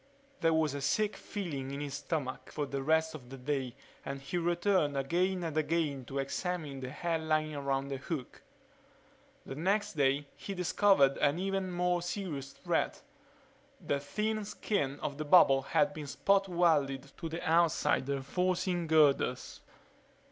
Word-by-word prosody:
There 165 - +3
was 155 -3 +2
a 140 - -4
sick 210 +9 +1
feeling 150 -10 -5
in 140 +1 -5
his 145 -2 -4
stomach 140 -2 -4
for 150 - -2
the 140 0 -3
rest 160 +3 +2
of 130 -6 -10
the 135 - -8
day 130 -2 -2 0.3
and 140 0 -5
he 135 +6 -6
returned 175 -3 +1
again 180 +7 0
and 160 -3 -3
again 155 -4 0
to 135 - -6
examine 150 0 -3
the 130 -1 -5
hairline 155 0 -1
around 140 -1 -1
the 135 - -3
hook. 140 -1 -6 1.0
The - - -6
next 195 +8 0
day 140 -1 +2
he 200 - -6
discovered 180 -6 +4
an 145 +2 +3
even 195 0 -1
more 180 0 +1
serious 170 -7 -4
threat: - - -2 0.8
the 140 - -1
thin 215 +9 -2
skin 170 -9 -2
of 140 0 -4
the - - -1
bubble 145 -4 +6
had 195 +8 +1
been 150 -2 -7
spot 195 +6 +2
welded 145 -6 +1
to 165 - -5
the 165 +2 -5
outside 165 -4 +2
reinforcing 175 +5 0
girders. 145 -5 +2
155 Hz, 155 wpm, -32 LUFS, 140-180 Hz, 1.0 s, bubble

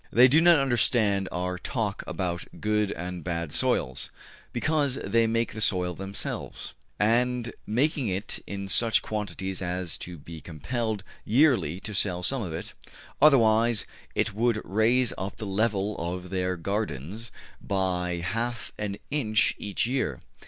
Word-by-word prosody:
They 125 +2 +8
do 150 +5 +5
not 170 -1 +7
understand 115 -7 +2
our 90 0 -2
talk 105 -1 -2
about 90 -2 -2
good 105 -1 +1
and 90 -1 -5
bad 85 -3 -2
soils, - - 0 0.4
because 145 +1 +1
they 115 -4 +2
make 115 +1 0
the 110 - -5
soil 90 -4 +2
themselves, 95 +3 -5 0.3
and 120 +2 +2
make 130 +9 +2
it 100 -5 -1
in 100 -1 -4
such 115 +3 +3
quantities 95 -3 -3
as 90 -2 -3
to 90 -1 -6
be 80 +2 -10
compelled 110 - -3 0.2
yearly 120 - +3
to 110 - -5
sell 90 -2 0
some 135 +6 0
of 90 -6 -4
it; 80 - -5 0.5
otherwise 115 -6 +5 0.3
it 110 -1 +1
would 115 +1 +2
raise 115 +5 +3
up 95 +2 -4
the 110 - -6
level 105 0 0
of 90 +2 -4
their 90 -1 0
gardens 100 - -3 0.3
by 90 -3 -1
half 115 +4 -2
an 100 -1 -2
inch 110 -8 +2
every 100 -1 -6
year. 120 - -1
105 Hz, 145 wpm, -27 LUFS, 90-115 Hz, 0.5 s, They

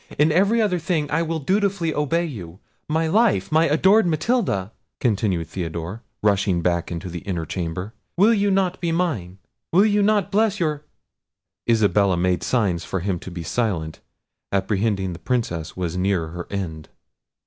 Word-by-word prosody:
In 150 +2 +4
every 200 +8 +3
other 200 -5 +2
thing 160 -3 -1
I 165 +3 +2
will 165 0 -1
dutifully 190 +1 0
obey 155 +4 0
you. 95 - -8 0.3
My 160 +2 +1
life! 220 +5 +2
my 160 +2 +4
adored 190 +7 +4
Matilda!" 160 - 0 0.3
continued 100 -7 0
Theodore, 85 +3 -5 0.2
rushing 100 -4 +2
back 85 -1 0
into 85 +2 -5
the 85 0 -5
inner 85 -3 -3
chamber, 90 +5 -4 0.2
"will 210 +6 +6
you 205 -2 +2
not 190 -2 +1
be 170 -2 0
mine? 135 - -1 0.3
Will 190 +5 +5
you 210 -1 +3
not 205 -2 +2
bless 210 0 +2
your—" 150 -3 -1 0.8
Isabella 105 -4 +3
made 90 0 +1
signs 95 -5 0
to - - -1
him 90 -1 -2
to - - -8
be 85 -2 -6
silent, 85 -6 -2 0.5
apprehending 95 -1 0
the 85 - -9
Princess 95 -12 -2
was 90 -2 -2
near 90 -3 0
her 85 +1 -7
end. 80 -6 -5
110 Hz, 160 wpm, -23 LUFS, -, 0.8 s, will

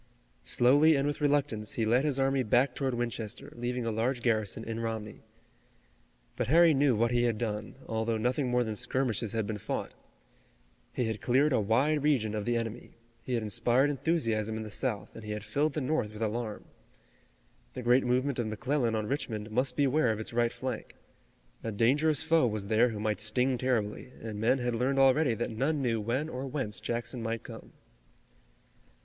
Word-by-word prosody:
Slowly 145 +6 +5
and 140 0 +1
with 145 +1 -2
reluctance, 140 -7 0
he 115 - 0
led 120 +4 +3
his 145 -3 0
army 135 0 +2
back 125 +3 +2
toward 130 -2 -1
Winchester, 115 -3 -4
leaving 120 0 -3
a 115 - 0
large 120 +3 -1
garrison 110 -2 0
in 115 0 -4
Romney. 110 -2 -4 1.1
But - - -2
Harry 165 +3 +6
knew 140 -3 +3
what 115 +2 +1
he 120 0 +2
had 115 -3 0
done, 105 -2 -4
although 110 0 -1
nothing 125 +4 0
more 125 0 +2
than 110 -2 -4
skirmishes 115 -2 -1
had 110 -2 0
been 105 0 -4
fought. - - -4 1.0
He 125 - -1
had 110 -1 -3
cleared 135 +4 +3
a - - +3
wide 135 +9 +2
region 130 -8 +1
of 105 -1 -3
the 120 0 +1
enemy. 115 -1 -5 0.3
He 125 +1 -2
had 115 - -1
inspired 120 +6 +2
enthusiasm 115 -8 -1
in 110 - -4
the 105 - -8
South, 115 -3 -3
and 115 - -9
he 105 0 -4
had 105 -1 -5
filled 140 +8 0
the 155 - -2
North 130 -6 -1
with 105 +1 -4
alarm. 110 0 -3 1.1
The 125 - -5
great 125 +2 +4
movement 130 +2 0
of 120 - -1
McClellan 120 +2 0
on 110 -1 -1
Richmond 110 -4 -3
must 125 +3 0
beware 140 -2 +2
of 110 - -3
its 110 - -5
right 120 0 +2
flank. 130 -3 -5 0.7
A 115 - -3
dangerous 140 +8 +2
foe 160 -5 +3
was 105 -3 -3
there 115 +3 +4
who 110 -2 -5
might 105 0 -1
sting 125 +5 +1
terribly, 125 -1 -1
and 110 -2 -6
men 120 +4 +3
had 120 -1 -1
learned 130 +4 0
already 135 -1 +4
that 120 +2 -3
none 135 +7 0
knew 115 -3 0
when 125 +8 -1
or 135 -3 -5
whence 130 -6 -3
Jackson 120 +1 -3
might 115 -1 -3
come. - - -11
120 Hz, 190 wpm, -30 LUFS, 110-135 Hz, 1.1 s, Harry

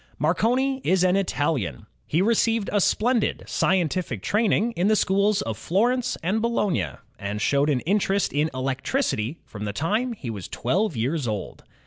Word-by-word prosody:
Marconi 250 - +1
is 185 -1 +2
an 185 0 +3
Italian. 145 - -1 0.2
He 165 +5 +2
received 225 -1 +1
a 205 - +3
splendid 235 +4 +1
scien 180 -2 +2
tific 150 - -4
training 220 +1 +2
in 185 -3 0
the 215 - +4
schools 200 +1 +2
of 110 -1 -4
Florence 240 +7 +1
and 200 +6 0
Bologna, 230 -6 0 0.3
and 100 +1 -4
showed 140 +6 +2
an 130 -4 +1
interest 200 +1 +1
in 150 +2 +1
electricity 135 - -1
from 105 -1 -7
the 100 - -3
time 215 - 0
he 130 - -6
was 100 -5 -6
twelve 170 - -1
years 135 +4 -1
old. 105 -3 -5
185 Hz, 160 wpm, -24 LUFS, 135-215 Hz, 0.3 s, the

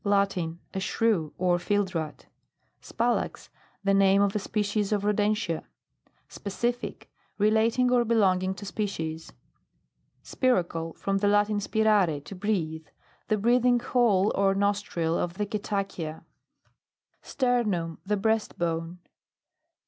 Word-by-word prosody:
Latin. 195 -5 +1 0.2
A 190 - -2
Shrew, 190 -5 0
or 175 -1 +2
fieldrat. 180 -5 -2 0.6
SPALAX. 235 +1 -2 0.3
The 195 0 +2
name 195 0 +5
of 200 0 0
a - - +2
species 205 0 -1
of 205 -2 +1
rodentia. 210 -4 0 0.6
SPECIFIC. 240 +4 -4 0.3
Relating 225 +4 +3
or 245 -1 +4
belonging 190 -5 +2
to 205 - -9
species. 165 -6 -4 0.9
SPIRACLE. 170 -10 0
From 195 0 -1
the 205 - +1
Latin, 205 0 +3
spirare, 205 -7 +2
to 175 - -9
breathe. 175 -6 -2 0.4
The 215 - +1
breathing 245 +3 +3
hole 225 -5 +2
or 195 0 +2
nostril 200 -5 0
of 170 -1 -2
the 210 +1 -1
cetacea. 195 -6 -4 1.0
STERNUM 210 - 0
The 210 +2 0
breast 220 +1 0
bone. 165 0 -2
200 Hz, 115 wpm, -27 LUFS, 180-215 Hz, 1.0 s, name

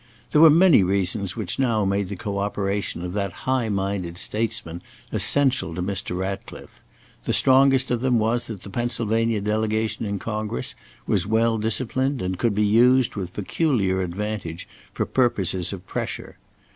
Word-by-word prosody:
There 150 - +4
were 165 - +9
many 165 - +6
reasons 95 +1 0
which 110 -1 -2
now 115 -6 +1
made 100 -1 -1
the 100 - -4
co 100 +2 -4
operation 100 -2 -2
of 90 - -5
that 100 -1 -2
high 130 -3 0
minded 95 -3 -2
statesman 90 -6 -1 0.3
essential 130 -12 +1
to 90 - -3
Mr. 95 -2 -3
Ratcliffe. 95 +1 -6 0.4
The - - 0
strongest 135 0 +4
of 120 -1 0
them 125 -2 +2
was 115 +2 0
that 105 -5 -8
the 100 - -9
Pennsylvania 115 -1 0
delegation 110 +1 -1
in 100 0 -2
Congress 105 - -3 0.3
was - - 0
well 115 +1 +2
disciplined 130 +4 0
and 90 -2 -3
could 115 -4 +1
be 105 +1 +2
used 125 +4 +4
with 90 -3 -5
peculiar 105 - 0
advantage 90 -2 -4 0.2
for - - -2
purposes 95 -8 +2
of 95 -2 -8
"pressure." - - -5
105 Hz, 160 wpm, -23 LUFS, 95-120 Hz, 0.4 s, were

